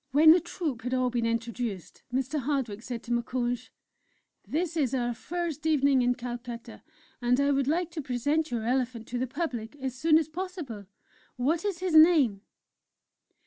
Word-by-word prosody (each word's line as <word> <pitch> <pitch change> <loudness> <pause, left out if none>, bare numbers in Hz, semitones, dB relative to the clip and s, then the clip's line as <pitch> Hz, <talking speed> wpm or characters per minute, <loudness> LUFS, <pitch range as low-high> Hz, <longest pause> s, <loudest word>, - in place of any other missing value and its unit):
When 305 +3 +7
the 345 - +7
Troupe 325 -7 -4
had 250 +2 -1
all 255 -1 +1
been 235 -1 0
introduced, 230 -5 -3
Mr. 265 +4 -1
Hardwick 260 -6 -2
said 240 -1 -6
to 240 - -7
Moukounj: 240 0 -1 0.8
"This 335 +2 -1
is 275 -5 +1
our 240 -1 0
first 325 +3 -4
evening 280 -4 +4
in 245 0 +2
Calcutta, 240 -1 -7 0.4
and 245 +2 +2
I 280 0 +3
would 275 -1 +1
like 340 +3 0
to 330 -2 -4
present 290 +5 0
your 235 -3 -2
elephant 245 -2 -1
to 245 - -2
the 255 - -1
public 255 -4 -4
as 265 -3 -4
soon 310 +4 +4
as 320 -2 +1
possible; 315 - -6 0.5
what 305 +7 0
is 380 -4 -2
his 370 -3 -1
name?" 310 - +6
260 Hz, 170 wpm, -28 LUFS, 240-315 Hz, 0.8 s, When